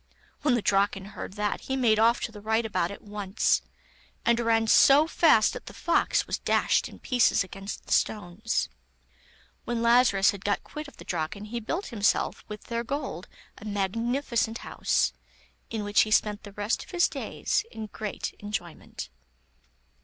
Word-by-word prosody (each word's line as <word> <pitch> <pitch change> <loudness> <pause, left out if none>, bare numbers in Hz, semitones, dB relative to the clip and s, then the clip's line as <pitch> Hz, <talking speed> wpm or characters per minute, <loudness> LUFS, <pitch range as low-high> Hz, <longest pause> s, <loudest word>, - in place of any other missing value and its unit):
When 280 -5 +3
the 235 - -1
Draken 195 -1 +1
heard - - -7
that 210 0 -2
he 265 - -3
made 230 -5 +3
off 230 +2 +4
to - - -3
the 210 -2 -11
rightabout 220 -5 0
at 200 - -9
once, 205 -1 0 0.6
and 235 0 +3
ran 225 -1 +2
so 275 +6 +6
fast 315 -9 +4
that - - -9
the - - -9
fox 340 - +1
was - - -3
dashed - - +2
in - - -13
pieces 245 -5 +2
against 195 +2 -8
the - - -11
stones. 210 +2 0 1.0
When 235 -1 -1
Lazarus 235 -5 +5
had 200 -2 -9
got 205 0 0
quit 300 -1 -7
of 280 - -15
the - - -12
Draken 180 +7 -3
he 235 +3 -4
built 330 - -3
himself, 215 -4 0
with 210 -1 -8
their 235 -1 -3
gold, 260 - -4 0.3
a - - -12
magnificent 230 +4 -1
house, - - +1 0.6
in 220 -2 -3
which 205 0 +4
he 215 - +1
spent 210 -1 +2
the 205 -2 -11
rest 205 +2 -1
of - - -18
his 350 -2 +3
days 425 - -2
in 220 - -7
great 215 0 -5
enjoyment. 190 - -6
220 Hz, 170 wpm, -27 LUFS, 205-240 Hz, 1.0 s, so